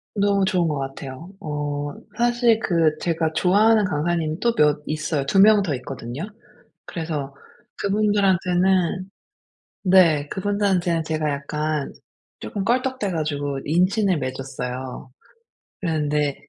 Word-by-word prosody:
너무 200 -1 +2
좋은 180 -3 +1
것 150 - -1
같아요. 135 +3 -7
어 145 -2 -3 0.2
사실 240 -1 +3
그 165 -7 +2
제가 165 -2 0
좋아하는 210 +5 +4
강사님이 160 0 -1
또 235 -1 +2
몇 150 0 +3
있어요. 155 -2 -2
2 195 +7 +2
명 210 0 +7
더 160 -6 -1
있거든요. 125 +2 -6 0.6
그래서 150 -5 -4 0.4
그분들한테는 190 -3 +1 0.8
네 165 -6 +5
그분들한테는 190 -4 0
제가 155 -1 -1
약간 150 +1 -2 0.5
조금 200 -2 -4
껄떡대 250 -2 0
가지고 145 -4 -2
인친을 185 +3 +2
맺었어요. 130 -1 -5 0.7
그랬는데 150 -4 0
165 Hz, 260 characters per minute, -23 LUFS, 145-195 Hz, 0.8 s, 명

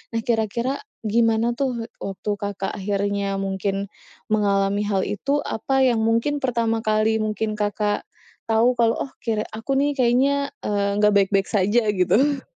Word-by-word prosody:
Nah, 225 - +1
kira-kira 235 +3 -1 0.2
gimana 225 +1 +2
tuh, 240 -2 -3
waktu 195 +2 -5
Kakak 200 -1 -3
akhirnya 200 0 -1
mungkin 195 +1 -2 0.4
mengalami 200 -1 +2
hal 195 -2 +1
itu, 280 +8 -1
apa 265 +4 0
yang 240 -3 +3
mungkin 230 +6 +1
pertama 230 -3 0
kali 220 0 +1
mungkin 215 0 -2
Kakak 205 0 -1 0.4
tahu 230 +3 +4
kalau, 235 -2 +2
oh, 270 - -5
kira 220 -2 -1
aku 270 +5 -2
nih 290 +1 +2
kayaknya, 275 +2 +2 0.2
eee, 200 -1 0
enggak 210 0 +4
baik-baik 195 -1 +3
saja 210 +3 +2
gitu? 265 +10 +2
220 Hz, 145 wpm, -23 LUFS, 200-240 Hz, 0.4 s, tahu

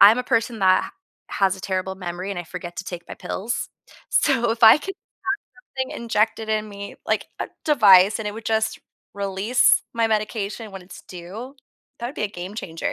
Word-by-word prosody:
I'm 215 +5 +9
a - - 0
person 230 -2 0
that 185 -1 +4 0.4
has 195 -1 +2
a - - -11
terrible 190 0 -2
memory, 180 +1 -5
and 195 - -3
I 175 - -5
forget 175 0 -8
to 195 - -4
take 175 -2 -7
my - - -6
pills. 225 +5 -3 0.4
So, 270 - +3
if 230 - -8
I 220 +6 +10
could 390 +6 -6
have - - -67 0.7
something 260 - -2
injected 220 -1 0
in 215 0 0
me, 200 0 -8
like, - - 0
a - - -2 0.2
device, 205 -8 +6
and 215 - -4
it - - -4
would 225 - -8
just 220 0 0 0.4
release 200 +4 +3
my 230 -1 +2
medication 215 0 -2
when 195 -1 -8
it's 180 +1 -12
due, 200 +10 -9 0.4
that 235 - -3
would 265 - -7
be - - -2
a - - -1
game 185 0 -7
changer. 165 -6 -4
210 Hz, 200 wpm, -23 LUFS, 190-230 Hz, 0.7 s, I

